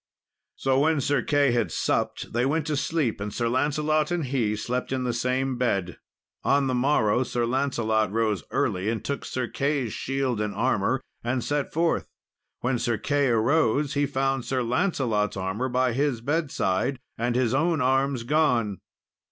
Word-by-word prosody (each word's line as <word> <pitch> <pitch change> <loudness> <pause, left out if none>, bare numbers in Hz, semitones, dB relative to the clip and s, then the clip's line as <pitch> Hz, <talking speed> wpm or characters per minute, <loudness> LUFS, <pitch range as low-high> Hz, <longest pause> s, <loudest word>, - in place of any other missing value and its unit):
So 135 0 +1
when 155 +1 +3
Sir 140 -1 +1
Key 145 +1 +2
had 115 -8 0
supped, - - -1
they 120 +1 +1
went 150 +3 +1
to 155 -1 -1
sleep, 140 -7 -1
and 105 +1 -3
Sir 120 +2 -1
Lancelot 150 +4 +1
and 175 -4 -1
he 120 -5 0
slept 125 +4 -3
in 130 -1 -1
the 125 -1 -1
same 125 +1 -1
bed. 100 -8 -1 0.4
On 140 0 +3
the 130 - 0
morrow, 125 -3 +2
Sir 120 -2 -1
Lancelot 115 -5 0
rose 110 -3 0
early, 95 +3 0
and 115 -1 -3
took 140 - -3
Sir 130 -1 -3
Key's 140 -2 -1
shield 135 -4 -1
and 105 -1 -2
armour 125 +2 +1 0.2
and 120 +1 -1
set 145 -1 -1
forth. 165 +1 +1 0.5
When 125 0 0
Sir 120 -2 0
Key 145 +2 +1
arose, 135 +4 +2
he 145 -1 +1
found 135 -2 0
Sir 130 0 -1
Lancelot's 120 - 0
armour 95 +7 -2
by 125 0 +1
his 135 -1 0
bedside, 135 - 0 0.2
and 120 +1 -1
his 125 -2 +2
own 160 +3 +2
arms 135 -1 +1
gone. 120 -8 +1
130 Hz, 170 wpm, -26 LUFS, 115-140 Hz, 0.5 s, when